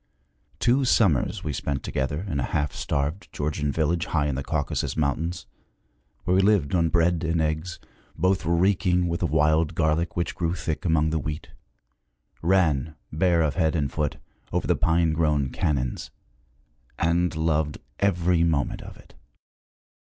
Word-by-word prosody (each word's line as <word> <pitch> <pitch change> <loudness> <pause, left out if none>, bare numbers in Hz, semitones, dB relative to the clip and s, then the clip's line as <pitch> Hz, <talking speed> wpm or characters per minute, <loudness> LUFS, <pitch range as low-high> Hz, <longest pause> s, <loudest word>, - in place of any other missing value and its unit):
Two 130 +3 +2
summers 100 - +2
we 75 - -2
spent 70 +1 -3
together 75 +4 -2
in 70 -7 -2
a - - -3
half 75 -2 -1
starved 75 +4 -2
Georgian 75 0 -2
village 80 +3 0
high 75 -3 +1
in 75 - 0
the 65 - -3
Caucasus 75 0 -2
Mountains, 80 +4 -1 0.8
where 90 - +1
we 95 - +5
lived 95 -8 +2
on 85 -2 +3
bread 85 0 +2
and 80 0 0
eggs, 80 +3 -1 0.4
both 95 +3 +1
reeking 90 +1 +2
with 85 0 -2
the 90 - 0
wild 80 0 +2
garlic 80 +2 0
which 85 -2 -1
grew 85 0 -1
thick 80 -1 -4
among 80 -2 +2
the 80 - 0
wheat; 75 +2 -5 0.9
ran, 80 -4 +2 0.2
bare 85 +1 +2
of 75 -3 0
head 80 -3 +1
and 70 -5 0
foot, 75 -2 -2 0.3
over - - -1
the - - +2
pine 80 -1 +2
grown 75 -4 +1
canons; 65 -4 -1 0.9
and 85 +1 +1
loved 80 -2 0 0.2
every 90 -3 +2
moment 80 -4 0
of - - -11
it. - - -18
80 Hz, 155 wpm, -25 LUFS, 75-85 Hz, 0.9 s, we